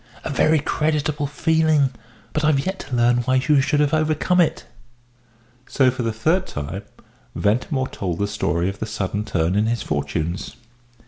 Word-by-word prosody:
"A - - -4
very 155 +3 +3
creditable 150 0 0
feeling 155 -2 +2 0.4
but 155 - -1
I've 150 -3 +2
yet 190 +1 -3
to 130 - -5
learn 120 0 +3
why 125 +2 +1
you 135 +2 +3
should 145 +2 +1
have 150 0 +2
overcome 155 +3 +2
it." 170 - 0 1.0
So, 130 -3 +3
for 130 +1 -5
the 115 -1 0
third 160 - +1
time, 75 +7 -5 0.5
Ventimore 125 +5 0
told 90 -4 -3
the 100 - 0
story 90 -4 -1
of 100 +1 -4
the 110 - -3
sudden 105 -1 -3
turn 85 -4 0
in 105 +2 +2
his 115 -2 -1
fortunes. 75 +7 -3
130 Hz, 170 wpm, -22 LUFS, 105-155 Hz, 1.0 s, very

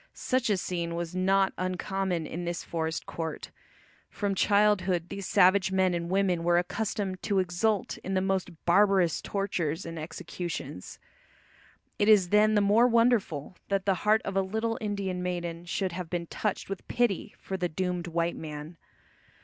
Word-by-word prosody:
Such 255 -2 0
a 205 - +3
scene 170 -2 -3
was 170 0 -4
not 190 +1 +2
uncommon 185 -1 -1
in 170 +3 -5
this 175 0 -3
forest 160 -1 -3
court. 160 -2 -5 0.6
From 200 -1 -2
childhood 190 -3 +2
these 195 -2 -5
savage 190 0 +4
men 190 -1 +2
and 170 0 -2
women 185 -3 +1
were 175 0 +3
accustomed 190 +1 -2
to 200 -2 0
exult 190 +3 0
in 190 +1 -4
the - - +3
most 185 -3 -2
barbarous 190 -2 +4
tortures 175 -6 -2
and 165 -1 -6
executions. 165 - -6 1.0
It 205 - +3
is 195 -5 +6
then 215 +2 +4
the 205 - +4
more 210 +4 +5
wonderful 230 - +2
that 195 -1 0
the 195 - +3
heart 215 +1 +3
of 195 - -3
a 195 - +4
little 220 +4 -2
Indian 200 -4 -2
maiden 175 -1 -3
should 185 +2 -1
have 175 -1 -5
been 175 -1 -2
touched 210 +4 -3
with 195 -1 -6
pity 230 -3 0
for 190 - -5
the 180 -2 -1
doomed 180 +1 -2
white 170 0 -1
man. 155 +1 -7
185 Hz, 165 wpm, -28 LUFS, 170-200 Hz, 1.0 s, is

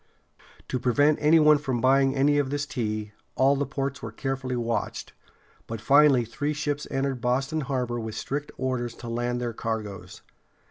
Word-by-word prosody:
To 130 - -1
prevent 145 +5 +3
any 155 +2 +6
one 150 -1 +6
from 130 -4 -2
buying 135 +2 +3
any 145 +2 +3
of 140 -2 0
this 145 +1 -2
tea, 110 -6 -3 0.2
all 135 +2 +4
the 140 0 -1
ports 140 0 -3
were 115 - -6
carefully 135 +1 -3
watched; 115 -1 -3 0.5
but 115 -1 -5
finally 135 +1 +5
three 145 +6 -2
ships 145 0 -3
entered 135 -2 -2
Boston 135 +5 0
harbor 125 -3 -2
with 110 -1 -5
strict 145 +2 -4
orders 125 -2 -2
to 120 - -9
land 120 +1 -2
their 120 -1 -3
cargoes. 105 -5 -5
130 Hz, 170 wpm, -26 LUFS, 120-145 Hz, 0.5 s, any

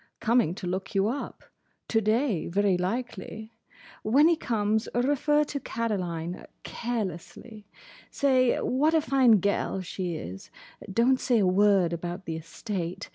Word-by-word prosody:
Coming 230 -7 +2
to 190 - -7
look 190 +3 -4
you 195 +1 +3
up. 275 +4 -5 0.5
To 225 - +2
day, 220 - +1
very 200 +1 +2
likely. 220 +2 -4 0.5
When 275 +8 +4
he 340 - +4
comes, 220 -6 -1
refer 290 +4 +2
to 290 -1 -4
Caroline—carelessly. 200 - -5 0.4
Say 260 -3 +2
what 300 +6 +2
a 320 - +4
fine 260 -7 +4
gel 200 -1 0
she 180 -1 -4
is. 95 - -8 0.4
Don't 245 +6 +3
say 245 - +2
a 205 - +3
word 190 -2 +3
about 175 +2 -5
the 165 - -4
estate. 180 +2 -5
210 Hz, 130 wpm, -27 LUFS, 180-245 Hz, 0.5 s, When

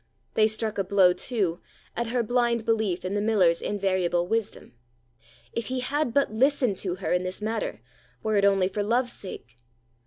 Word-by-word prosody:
They 215 -1 +4
struck 215 -1 -2
a - - +2
blow, 190 -2 +4
too, 185 -4 -2 0.4
at 235 0 -2
her 240 +1 0
blind 235 -1 +1
belief 215 -6 0
in 185 - -2
the 205 - 0
miller's 195 -6 +3
invariable 185 -4 0
wisdom. 220 - -3 0.8
If 230 -2 -3
he 255 0 -2
had 280 +1 -1
but 275 -2 +1
listened 255 -3 +2
to 180 -3 -2
her 185 -1 -2
in 180 - +2
this 185 0 -4
matter, 220 +1 -3 0.4
were 220 -1 0
it 200 - +3
only 195 -2 +4
for 205 +2 -3
love's 240 +4 +1
sake! 120 - -9
210 Hz, 180 wpm, -26 LUFS, 185-235 Hz, 0.8 s, They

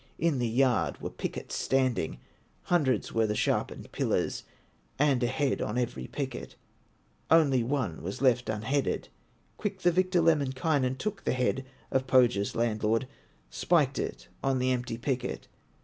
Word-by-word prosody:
In 160 -5 +1
the 120 - +1
yard 125 +2 +2
were - - -5
pickets - - -5
standing, 130 - 0 0.5
Hundreds 140 - +1
were 115 -1 +2
the 105 - -1
sharpened - - -1
pillars, - - -1 0.5
And 140 -2 +3
a 120 - +2
head 135 +2 0
on 105 - -2
every 90 - -2
picket, 60 +2 -5 0.7
Only 145 -6 +5
one 115 - -2
was 95 +4 -5
left 125 -3 +3
un 110 -1 -2
headed. 140 +3 -1 0.5
Quick 200 -3 -3
the 175 - +4
victor, 185 0 +2
Lemminkainen, 140 -3 +2
Took 210 +4 -4
the - - +1
head 130 +1 0 0.3
of 130 0 +1
Pohya's 120 -6 +3
landlord, 115 +1 +1 0.4
Spiked 145 -6 +2
it - - -4 0.2
on 135 -1 +2
the 130 0 +1
empty 120 -2 -2
picket. 125 0 -3
130 Hz, 150 wpm, -29 LUFS, 115-145 Hz, 0.7 s, Only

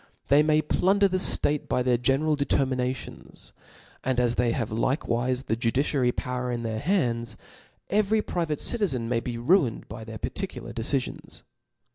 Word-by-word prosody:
They 140 +2 +6
may 155 0 +3
plunder 200 +2 +3
tbt 185 0 +2 0.2
ftate - - -23
by 125 - +1
their 125 -1 +3
general 135 +5 +2
determinations; 130 -3 -2 0.5
and 130 -1 +1
as 120 -1 +2
they 120 -1 +1
have 115 -3 -2
likewife 125 +2 0
the 110 - 0
judiciary 125 +2 +1
power 125 0 -3
in 120 -1 -3
their 110 -1 -2
hands, 120 - 0 0.5
fvcry 210 +1 +2
private 165 -4 -2
citizen 170 - +1
may 120 0 +1
be 120 0 -5
ruined 135 - +2
by 110 - -8
their 110 0 -7
par - - -3
ticular - - -5
decifions. 125 +3 -2
125 Hz, 155 wpm, -26 LUFS, 120-155 Hz, 0.5 s, They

